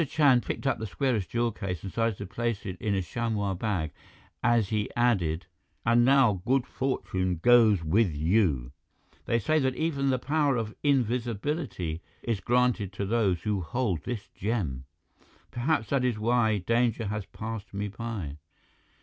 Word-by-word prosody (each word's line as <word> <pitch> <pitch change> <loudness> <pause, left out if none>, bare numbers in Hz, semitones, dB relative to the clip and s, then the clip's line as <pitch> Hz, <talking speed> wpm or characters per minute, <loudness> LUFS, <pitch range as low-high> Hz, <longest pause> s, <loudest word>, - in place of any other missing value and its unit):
Chand 140 -6 +4
picked - - -4
up 130 - +1
the 110 - -3
squarish 110 -1 0
jewel 120 +3 0
case 90 -5 -5
and 95 - -5
started 115 -3 0
to - - -6
place 115 +2 -3
it 95 -2 -4
in 105 -2 0
a 95 - 0
chamois 105 0 -1
bag, 90 -5 -2 0.5
as 120 -4 +3
he 105 -2 -1
added: 95 -9 +1 0.4
"And 115 +1 +5
now 125 -7 +4
good 130 +2 +2
fortune 95 -11 -1
goes 110 -3 +5
with 95 +5 +3
you. 75 - +1 0.5
They 115 - +2
say 155 +8 +2
that 130 -2 0
even 140 -4 0
the 130 - +2
power 145 0 +1
of 110 -2 -3
invisibility 120 - -1 0.2
is 115 -4 -1
granted 120 -2 +1
to 100 +1 -3
those 100 -5 +1
who 105 -3 0
hold 95 - -1
this 110 +2 -5
gem. 90 - -3 0.7
Perhaps 120 -2 0
that 135 -2 +1
is 125 -3 +1
why 110 -1 +2
danger 115 +3 +1
has 105 -1 -3
passed 110 -2 -6
me 100 +1 -3
by." 105 -9 -5
110 Hz, 160 wpm, -28 LUFS, 95-125 Hz, 0.7 s, And